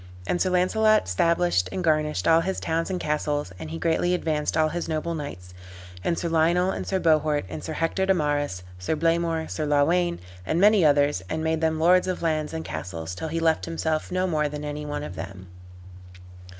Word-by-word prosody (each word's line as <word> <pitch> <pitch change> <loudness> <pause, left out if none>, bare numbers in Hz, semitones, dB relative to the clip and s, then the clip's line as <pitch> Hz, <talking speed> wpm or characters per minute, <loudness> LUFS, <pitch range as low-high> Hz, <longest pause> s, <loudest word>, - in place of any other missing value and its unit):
And 175 - -1
Sir 185 - +2
Launcelot 215 - +3
stablished 165 - +1
and 185 - -3
garnished 155 -2 +1
all 165 0 +5
his 190 +2 -2
towns 165 +2 -1
and 185 -1 -2
castles, 150 - -2
and 80 - -7
he 80 - -5
greatly 170 - +1
advanced 155 -3 -1
all 155 -1 +3
his 175 +1 -4
noble 160 +1 -2
knights, 90 - -7 0.6
Sir 170 - -3
Lionel 170 +3 +2
and - - -5
Sir 190 - 0
Bohort, 155 - +2
and 80 -2 -7
Sir - - -4
Hector 180 +4 0
de 190 - +5
Marys, 145 - -1 0.2
Sir 90 +12 -1
Blamor, 165 0 0
Sir 155 -1 -3
Lawayne, 170 +5 +2 0.3
and 160 - -1
many 205 -1 +5
others, 145 -6 +3
and 160 - -2
made 160 0 0
them 160 -1 +1
lords 180 +3 +4
of 185 -2 -3
lands 155 -2 0
and 160 0 -5
castles; 85 -1 -5
till 160 - -5
he 165 +1 -2
left 160 -1 +1
himself 160 -1 -2
no 185 +1 +1
more 155 -4 0
than 150 0 -6
any 150 0 -5
one 145 0 -4
of 90 - -7
them. 95 +2 -8
160 Hz, 200 wpm, -25 LUFS, 145-170 Hz, 0.6 s, all